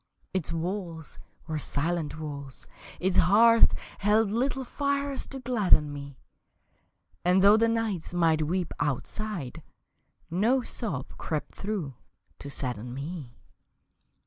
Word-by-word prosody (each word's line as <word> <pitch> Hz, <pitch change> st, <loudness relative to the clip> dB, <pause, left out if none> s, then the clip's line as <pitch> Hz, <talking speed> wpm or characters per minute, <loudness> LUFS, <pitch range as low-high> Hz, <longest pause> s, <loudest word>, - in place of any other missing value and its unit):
Its 185 Hz, -4 st, -1 dB
walls 170 Hz, -1 st, -4 dB, 0.3 s
were 155 Hz, -2 st, -3 dB
silent 155 Hz, +2 st, -2 dB
walls; 140 Hz, -3 st, -7 dB, 0.3 s
its 185 Hz, 0 st, +1 dB
hearth 230 Hz, +6 st, +6 dB, 0.2 s
Held 210 Hz, +1 st, +3 dB
little 265 Hz, +4 st, 0 dB
fires 280 Hz, +1 st, -1 dB
to 270 Hz, -, -6 dB
gladden 210 Hz, -, +3 dB
me 140 Hz, -1 st, -8 dB, 1.1 s
And 180 Hz, +2 st, +4 dB
though 205 Hz, +1 st, +8 dB
the 230 Hz, +1 st, +4 dB
nights 225 Hz, -7 st, -1 dB
might 165 Hz, -3 st, +3 dB
weep 180 Hz, 0 st, -1 dB
outside 150 Hz, -, -3 dB, 0.7 s
No 230 Hz, +9 st, +2 dB
sob 160 Hz, -, -3 dB
crept 155 Hz, -2 st, -3 dB
through 195 Hz, -9 st, -3 dB, 0.5 s
to 140 Hz, -, -7 dB
sadden 125 Hz, -3 st, -2 dB
me. 140 Hz, -3 st, -6 dB
175 Hz, 115 wpm, -28 LUFS, 150-215 Hz, 1.1 s, though